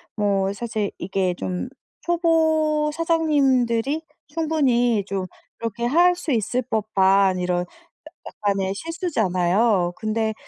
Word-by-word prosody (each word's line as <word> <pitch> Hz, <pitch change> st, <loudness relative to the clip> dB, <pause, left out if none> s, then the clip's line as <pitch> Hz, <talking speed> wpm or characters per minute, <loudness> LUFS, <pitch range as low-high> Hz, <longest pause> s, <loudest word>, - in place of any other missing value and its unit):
뭐 200 Hz, -2 st, +1 dB
사실 215 Hz, -1 st, -3 dB
이게 185 Hz, 0 st, -1 dB
좀 185 Hz, +8 st, -4 dB, 0.3 s
초보 315 Hz, -3 st, +2 dB
사장님들이 290 Hz, -5 st, +1 dB, 0.3 s
충분히 270 Hz, -9 st, +1 dB
좀 195 Hz, -2 st, -3 dB, 0.3 s
그렇게 230 Hz, +1 st, -4 dB
할 350 Hz, +7 st, +4 dB
수 330 Hz, -4 st, -4 dB
있을 240 Hz, +2 st, 0 dB
법한 195 Hz, -4 st, +2 dB
이런 180 Hz, 0 st, 0 dB
야 -, -, -4 dB, 0.6 s
약간의 195 Hz, -2 st, -2 dB
실수잖아요. 205 Hz, -, 0 dB
근데 220 Hz, 0 st, -1 dB
230 Hz, 225 characters per minute, -22 LUFS, 195-305 Hz, 0.6 s, 할